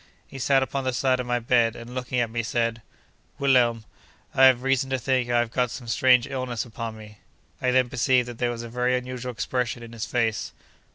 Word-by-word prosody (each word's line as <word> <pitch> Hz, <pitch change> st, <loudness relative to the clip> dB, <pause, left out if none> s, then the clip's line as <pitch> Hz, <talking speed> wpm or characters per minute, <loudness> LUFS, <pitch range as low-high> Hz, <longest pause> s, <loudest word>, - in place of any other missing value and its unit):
He 135 Hz, -, -10 dB
sat 135 Hz, +1 st, +3 dB
upon 135 Hz, +1 st, -3 dB
the 130 Hz, -1 st, -1 dB
side 130 Hz, +1 st, +1 dB
of 125 Hz, -, -3 dB
my 120 Hz, 0 st, +1 dB
bed, 115 Hz, -1 st, +2 dB
and 120 Hz, +1 st, -9 dB
looking 125 Hz, 0 st, -2 dB
at 115 Hz, -2 st, 0 dB
me, 115 Hz, 0 st, -1 dB
said: 115 Hz, 0 st, -1 dB, 0.6 s
'Wilhelm, 120 Hz, -5 st, +3 dB, 0.5 s
I 135 Hz, -, +6 dB
have 130 Hz, -1 st, +5 dB
reason 135 Hz, 0 st, +1 dB
to 135 Hz, -, 0 dB
think 130 Hz, 0 st, 0 dB
I 120 Hz, -, +2 dB
have 120 Hz, -1 st, 0 dB
got 125 Hz, 0 st, +1 dB
some 120 Hz, 0 st, -8 dB
strange 125 Hz, +1 st, +4 dB
illness 130 Hz, -4 st, -3 dB
upon 115 Hz, -1 st, -6 dB
me.' 105 Hz, -1 st, -13 dB, 0.4 s
I 125 Hz, -, +1 dB
then 130 Hz, 0 st, +3 dB
perceived 125 Hz, 0 st, +2 dB
that 120 Hz, -2 st, -8 dB
there 120 Hz, -, +1 dB
was 120 Hz, -1 st, -5 dB
a -, -, -6 dB
very 125 Hz, +2 st, 0 dB
unusual 125 Hz, 0 st, -5 dB
expression 125 Hz, 0 st, -2 dB
in 115 Hz, 0 st, -11 dB
his 115 Hz, 0 st, -5 dB
face. 115 Hz, -3 st, -1 dB
125 Hz, 220 wpm, -25 LUFS, 115-130 Hz, 0.6 s, I